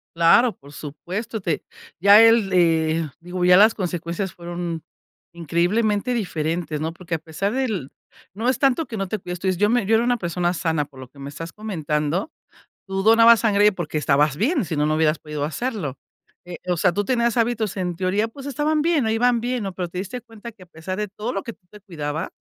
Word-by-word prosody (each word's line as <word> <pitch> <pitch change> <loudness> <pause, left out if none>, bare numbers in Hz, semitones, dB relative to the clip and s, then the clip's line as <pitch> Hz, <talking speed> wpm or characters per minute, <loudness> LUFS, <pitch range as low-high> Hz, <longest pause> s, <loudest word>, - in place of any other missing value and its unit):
Claro, 210 +8 +5
por 140 +1 -16
supuesto, 180 - -6
te 170 -5 -2 0.4
ya 200 +4 +8
él, 225 -3 +5
eh 165 -2 +2
digo, 180 +1 -3
ya 180 0 +7
las 215 +2 +6
consecuencias 175 0 -3
fueron 170 -1 -5 0.5
increíblemente 205 - 0
diferentes, 165 -6 -2
¿no? 160 +1 -2
Porque, 170 -1 -4
a - - -4
pesar 165 +7 -3
del 220 - -2 0.4
no 225 +5 -1
es 260 - +1
tanto 275 +3 +2
que 225 - -6
no 195 -1 -2
te 215 +2 -3
cuides 180 -1 -6
tú 190 - -3
dices 185 -2 +1
yo 210 0 +3
me 240 -4 +2
yo 225 +2 +3
era 230 - +3
una 245 0 +2
persona 175 -1 -1
sana 160 -3 -1
por 135 -2 -19
lo 130 -1 -10
que 140 - -19
me 140 +1 -7
estás 165 +3 -7
comentando, 165 - -2 0.6
tú 195 0 -2
donabas 230 0 +7
sangre 210 -1 +4
porque 165 -4 -3
estabas 145 0 +2
bien. 265 - +1
Si 155 -1 -4
no, 150 +1 +1
no 155 - +1
hubieras 155 0 +2
podido 150 -1 -5
hacerlo, 165 - -3 0.5
eh, 175 -1 -8
o 175 - +1
sea, 175 +1 +2
tú 205 +3 -1
tenías 235 -1 +1
hábitos 225 -4 0
en 180 -2 -2
teoría, 195 +5 0
pues 275 +4 -11
estaban 295 +3 0
bien, 315 -8 +2
ahí 220 - +1
iban 245 0 +2
bien, 245 -1 -2
¿no?, 195 - -4
pero 180 -2 -3
te 180 - -7
diste 205 +6 -5
cuenta 230 0 -11
que 195 - -19
a - - -13
pesar 170 +3 -6
de 210 -1 -3
todo 210 +5 -5
lo 195 - -3
que 230 - -7
tú 185 -4 -27
te 210 - -14
cuidabas, 160 -5 -5
185 Hz, 220 wpm, -22 LUFS, 165-225 Hz, 0.6 s, ya